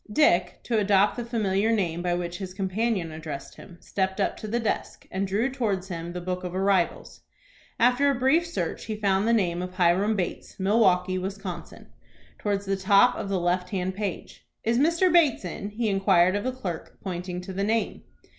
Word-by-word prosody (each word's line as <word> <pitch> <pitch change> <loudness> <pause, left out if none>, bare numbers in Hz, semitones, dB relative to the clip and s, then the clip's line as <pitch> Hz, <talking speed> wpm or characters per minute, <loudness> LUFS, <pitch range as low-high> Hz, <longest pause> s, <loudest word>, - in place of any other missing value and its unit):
Dick, 180 - +3
to 230 -3 +1
adopt 200 0 +3
the 240 - -3
familiar 220 -2 0
name 175 -6 0
by 175 0 0
which 175 0 -4
his 185 -2 -6
companion 195 -2 -1
addressed 155 -3 -7
him, 175 - -13
stepped 190 0 -2
up 200 - +1
to 215 - -7
the 235 +3 0
desk, 225 - -3
and 195 +1 -1
drew 205 +6 +1
towards 205 -7 -2
him 170 -1 -5
the 180 - -5
book 180 +1 -4
of 180 0 -5
arrivals. 190 -2 0 0.6
After 250 +4 +4
a 280 - +2
brief 265 +7 +3
search 340 - -3
he 215 - -3
found 200 0 +1
the - - +4
name 180 -6 +1
of 180 0 -6
"Hiram 185 +4 +3
Bates, 185 0 -4
Milwaukie, 185 -2 +3
Wis.," 195 +2 -4 1.0
towards 200 -1 -1
the 195 0 0
top 200 +5 +5
of 195 - -4
the 195 -2 0
left 180 +1 0
hand 185 -1 -2
page. 200 -2 -5 0.2
"Is 235 +2 +2
Mr. 335 +4 +3
Bates 305 - +4
in?" 195 +3 -5
he 220 +2 -2
inquired 195 -2 +3
of 205 - -2
the 255 - +1
clerk, 190 -10 -6
pointing 180 -1 -4
to 185 +1 -7
the 195 +1 -1
name. 220 +2 0
195 Hz, 195 wpm, -26 LUFS, 180-220 Hz, 1.0 s, top